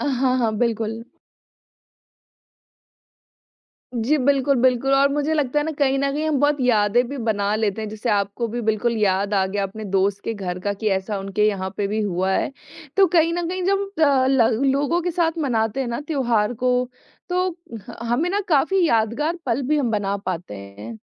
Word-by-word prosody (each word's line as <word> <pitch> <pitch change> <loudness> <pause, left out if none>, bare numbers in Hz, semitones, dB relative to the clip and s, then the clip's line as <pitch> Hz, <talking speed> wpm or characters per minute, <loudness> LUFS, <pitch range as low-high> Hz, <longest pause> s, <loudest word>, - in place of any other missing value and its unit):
अ, - - -2
हाँ, 255 0 +2
हाँ, 230 -3 +1
बिल्कुल। 225 -1 -1 2.9
जी 245 +7 +1
बिल्कुल, 275 +1 +2
बिल्कुल 255 +1 +2
और 275 +1 +5
मुझे 295 +2 0
लगता 295 -1 +1
है 295 - -1
ना 320 - -2
कहीं 275 -2 +2
न 275 0 0
कहीं 305 +2 -2
हम 300 -3 +1
बहुत 290 +1 +2
यादें 240 0 +3
भी 280 - -5
बना 210 -3 0
लेते 215 -1 -1
हैं, 215 - -4
जैसे 215 +3 -4
आपको 200 +3 0
भी 240 +2 -4
बिल्कुल 225 +1 0
याद 200 0 +1
आ 190 -1 +2
गया 200 +1 -2
अपने 200 +3 -6
दोस्त 195 +1 +1
के 225 - -2
घर 185 -4 -5
का 200 +2 -2
कि 215 +2 -4
ऐसा 195 +2 -4
उनके 195 +2 0
यहाँ 190 -3 -2
पे 200 -1 0
भी 215 +1 -1
हुआ 190 -1 0
है। 190 - 0 0.5
तो 390 -1 +6
कहीं 330 +1 +3
न 345 -1 -2
कहीं 365 +1 -3
जब 390 +1 +2 0.2
अ, 275 -3 +4
ल 265 -2 +3
ल 225 +1 +1
लोगों 290 +6 +1
के 355 - -2
साथ 335 -1 0
मनाते 230 -5 0
हैं 250 - -3
ना 235 +4 -3
त्योहार 240 -7 +1
को 250 0 +3 0.6
तो 365 +1 +1 0.4
ह - - -8
हमें 295 +9 +1
ना 400 +2 0
काफ़ी 340 +5 +3
यादगार 235 +9 0
पल 245 +2 0
भी 305 +1 +2
हम 255 -6 0
बना 200 -2 -1
पाते 175 - -4
हैं। 100 +3 -9
235 Hz, 200 wpm, -22 LUFS, 205-285 Hz, 2.9 s, तो